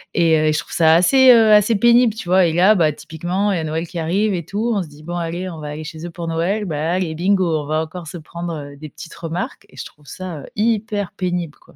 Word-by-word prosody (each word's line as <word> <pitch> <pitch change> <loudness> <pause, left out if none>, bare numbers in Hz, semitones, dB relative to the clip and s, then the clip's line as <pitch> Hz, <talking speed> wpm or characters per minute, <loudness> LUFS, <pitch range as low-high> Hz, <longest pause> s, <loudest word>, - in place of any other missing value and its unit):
et, 165 -2 +4
heu, 155 - +1
et 155 - +2
je 150 - 0
trouve - - -9
ça 160 -1 +5
assez, 260 +9 +6
heu, 225 -3 +6
assez 210 +2 +4
pénible, 235 +2 +4
tu 220 -5 -8
vois? 185 0 +5
Et 160 - -1
là, 185 +5 +5
bah, 160 -5 +3
typiquement, 175 +7 -3
il - - -1
y - - -1
a - - -3
Noël 160 +2 -3
qui 175 0 -6
arrive 195 +6 0
et 175 -2 -3
tout. 220 +6 -2
On 200 - 0
se 160 - -12
dit: 150 +1 -16
«Bon, 175 +2 -5
allez, 175 +2 -4
on 165 -3 -8
va 150 - -7
aller 150 +1 -6
chez 160 +1 -8
eux - - -5
pour 170 0 -7
Noël». 175 +6 -1
Bah, 160 -1 -2
allez, 180 -3 -1
bingo, 180 -2 +1
on - - -9
va 155 +1 0
encore 165 +1 -9
se 175 - -7
prendre, 170 +1 -7
heu, 145 -2 -8
des 155 +1 -9
petites 165 +3 -11
remarques 165 +1 -5
et - - -19
je - - -6
trouve 150 -1 -16
ça, 180 -2 -7
heu, - - -11
hyper 210 -2 -1
pénible, 175 -4 -3
quoi. - - -22
175 Hz, 285 wpm, -19 LUFS, 160-200 Hz, -, assez